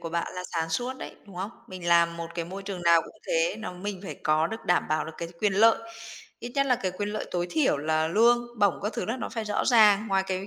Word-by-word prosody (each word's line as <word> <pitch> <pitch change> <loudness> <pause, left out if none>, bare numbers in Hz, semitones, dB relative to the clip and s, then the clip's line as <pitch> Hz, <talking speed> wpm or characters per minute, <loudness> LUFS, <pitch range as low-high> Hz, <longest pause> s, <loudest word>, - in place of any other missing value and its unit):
của 165 - -5
bạn 170 +1 -2
là 180 - -4
sáng 165 -1 -1
suốt 245 +9 -2
đấy, - - -8
đúng 195 -3 -13
không? 190 +4 -3 0.2
Mình 185 -2 -6
làm 170 0 +4
một 170 0 -5
cái 170 - -2
môi 190 +4 -7
trường 195 -3 -6
nào 170 -1 +6
cũng - - -13
thế, - - +1
nó 220 -4 -5
mình 190 +1 -5
phải - - -5
có 155 +1 +3
được 225 +6 -7
đảm 180 - +2
bảo 155 0 0
được 160 - -7
cái 170 - -4
quyền 210 -2 +2
lợi, 225 +4 +5 0.6
ít 240 +1 -7
nhất 275 -1 +2
là 255 - +4
cái 190 -5 -2
quyền 205 +3 -4
lợi 215 +1 -4
tối 175 -1 -1
thiểu 305 - +2
là 155 +1 +1
lương 235 +6 +4
bổng 200 -4 +4
các 210 +3 -2
thứ - - -3
là 225 - -2
nó - - -4
phải 225 -3 -4
rõ 210 -1 -1
ràng 215 -3 +5
ngoài 195 -1 +2
cái 190 +1 -3
195 Hz, 275 wpm, -27 LUFS, 170-220 Hz, 0.6 s, nào